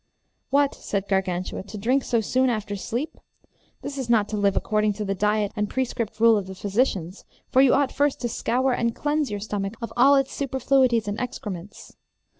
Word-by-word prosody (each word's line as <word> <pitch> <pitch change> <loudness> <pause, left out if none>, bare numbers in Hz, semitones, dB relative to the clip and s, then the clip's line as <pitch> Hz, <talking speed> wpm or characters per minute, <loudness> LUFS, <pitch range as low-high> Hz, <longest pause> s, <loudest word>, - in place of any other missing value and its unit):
What, 280 0 +3
said 200 -1 -3
Gargantua, 185 -2 -1
to 205 +2 -9
drink 250 +6 +1
so 235 -2 +1
soon 255 +4 +1
after 210 -3 -2
sleep? 235 +9 -4 0.6
This 280 -1 -5
is 255 -3 -4
not 220 -3 +3
to 215 - -3
live 200 -1 +1
according 215 -1 +1
to 210 +1 -4
the 195 - -1
diet 210 +1 +1
and 210 -1 -1
prescript 240 -4 -3
rule 230 -1 +6
of 190 - -7
the 190 - -8
physicians, 195 -3 -1 0.3
for 260 - +5
you 270 -1 +5
ought 280 -1 +2
first 285 -1 +1
to 240 - 0
scour 250 +3 0
and 235 -1 0
cleanse 295 -1 0
your 205 -1 -3
stomach 200 0 -3
of 230 -2 -6
all 270 +4 +6
its 270 -1 +1
superfluities 260 -4 +1
and 205 +2 -3
excrements. 205 -6 -7
225 Hz, 195 wpm, -24 LUFS, 205-260 Hz, 0.6 s, rule